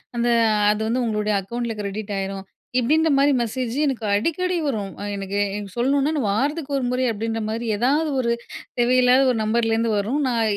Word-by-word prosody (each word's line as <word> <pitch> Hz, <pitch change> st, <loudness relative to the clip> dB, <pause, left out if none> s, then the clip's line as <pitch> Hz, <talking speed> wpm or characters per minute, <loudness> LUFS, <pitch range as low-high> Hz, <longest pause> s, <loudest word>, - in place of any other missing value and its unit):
அந்த 240 Hz, 0 st, +1 dB, 0.4 s
அது 215 Hz, +1 st, -2 dB
வந்து 245 Hz, +3 st, 0 dB
உங்களுடைய 210 Hz, -1 st, 0 dB
அக்கவுண்ட்டுல 235 Hz, +3 st, -4 dB
கிரெடிட் 205 Hz, +1 st, -4 dB
ஆயிரும். 195 Hz, 0 st, -4 dB, 0.3 s
இப்படின்ற 310 Hz, +6 st, +2 dB
மாரி 280 Hz, +1 st, +4 dB
மெசேஜ் 240 Hz, +1 st, -3 dB
எனக்கு 255 Hz, -6 st, -2 dB
அடிக்கடி 355 Hz, -, 0 dB
வரும். 205 Hz, -7 st, -2 dB
ஆ -, -, -4 dB
எனக்கு 195 Hz, +1 st, -3 dB, 0.4 s
சொல்லணுனா 275 Hz, +4 st, +1 dB
நான் 250 Hz, -7 st, 0 dB
வாரத்துக்கு 285 Hz, +6 st, -1 dB
ஒரு 260 Hz, -, -1 dB
முறை 255 Hz, 0 st, 0 dB
அப்படின்ற 225 Hz, +1 st, -3 dB
மாரி 230 Hz, +2 st, -3 dB
ஏதாவது 285 Hz, +8 st, +2 dB
ஒரு 235 Hz, -1 st, 0 dB, 0.5 s
தேவையில்லாத 250 Hz, +1 st, +4 dB
ஒரு 250 Hz, -, +1 dB
நம்பர்லேருந்து 225 Hz, +1 st, +1 dB
வரும். 225 Hz, +9 st, -1 dB
நான் 235 Hz, -3 st, +1 dB
235 Hz, 165 wpm, -22 LUFS, 215-270 Hz, 0.5 s, மாரி